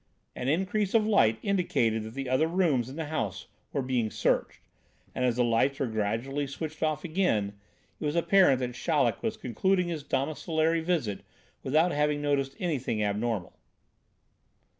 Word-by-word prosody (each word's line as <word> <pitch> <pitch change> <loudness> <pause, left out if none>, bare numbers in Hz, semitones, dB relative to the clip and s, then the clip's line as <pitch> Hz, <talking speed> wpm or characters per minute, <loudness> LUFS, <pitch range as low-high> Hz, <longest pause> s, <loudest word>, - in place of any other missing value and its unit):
An 125 - -4
increase 190 +7 0
of 220 -2 +4
light 115 - +4
indicated 145 - +1
that 110 +2 -8
the 135 -1 -4
other 130 +5 +2
rooms 160 -9 +1
in 135 - -8
the 160 0 -3
house 110 -10 -3 0.3
were 140 - -1
being 125 -4 0
searched, - - 0 0.5
and 125 - -2
as 120 -2 +2
the 125 - +2
lights 120 +4 +2
were 135 - +1
gradually 115 +6 -2
switched 155 +3 -6
off 155 -2 0
again, 155 - 0 0.5
it - - -4
was 150 +2 -1
apparent 170 -4 +5
that 125 -1 -2
Chaleck 125 - +1
was - - -2
concluding 180 - 0
his 160 -3 -3
domiciliary 155 +4 0
visit 160 - -1 0.4
without 155 +6 +2
having 150 0 +1
noticed 140 -2 0
anything 130 -11 -1
abnormal. 105 -2 -1
140 Hz, 160 wpm, -28 LUFS, 120-165 Hz, 0.5 s, apparent